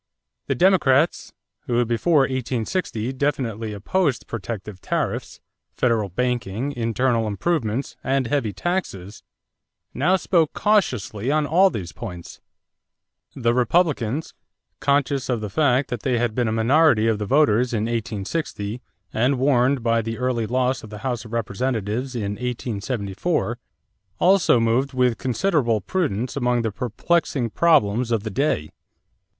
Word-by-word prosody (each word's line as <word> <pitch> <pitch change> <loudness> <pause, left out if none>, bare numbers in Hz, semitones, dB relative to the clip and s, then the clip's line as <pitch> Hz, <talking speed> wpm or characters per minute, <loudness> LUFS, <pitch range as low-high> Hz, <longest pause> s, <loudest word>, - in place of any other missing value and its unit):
The 135 - 0
Democrats, 165 -3 +3 0.4
who 120 0 +2
before 140 +7 +2
1860 130 - -2
definitely 120 -6 -2
opposed 135 - -1
protective 105 -3 -6
tariffs, - - -3 0.4
federal 115 -5 +1
banking, 120 +4 -2
internal 115 -2 0
improvements, 120 - -1
and 135 -1 +1
heavy 120 -4 0
taxes, 100 - -4 0.7
now 175 +7 +2
spoke 170 -4 +1
cautiously 125 - 0
on 150 +1 +2
all 185 +6 +4
these 90 - -5
points. 90 -7 -9 0.9
The 120 -2 +1
Republicans, 135 0 +1 0.5
conscious 140 -1 +1
of 120 -3 +1
the 105 -2 -5
fact 135 +1 +2
that 125 - -2
they 125 -3 0
had 120 -2 0
been 120 0 0
a - - 0
minority 115 +1 +4
of 110 -2 +1
the 105 - -3
voters 125 -3 +3
in 110 -3 0
1860 115 0 -3 0.3
and 125 +5 +2
warned 130 -1 +2
by 115 0 +2
the 115 0 -4
early 125 -3 -1
loss 130 +1 0
of 110 - -11
the 105 +3 -9
House 120 -3 -2
of 110 - -11
Representatives 115 +2 -2
in 105 -3 -3
1874, 115 -4 -2 0.6
also 180 -9 +4
moved 120 +4 +1
with 125 -2 +1
considerable 130 - +1
prudence 125 - -2
among 125 -3 +1
the 110 - -1
perplexing 125 - -1
problems 125 -8 +3
of 115 -3 0
the 110 - -4
day. 115 - 0
125 Hz, 135 wpm, -23 LUFS, 110-140 Hz, 0.9 s, all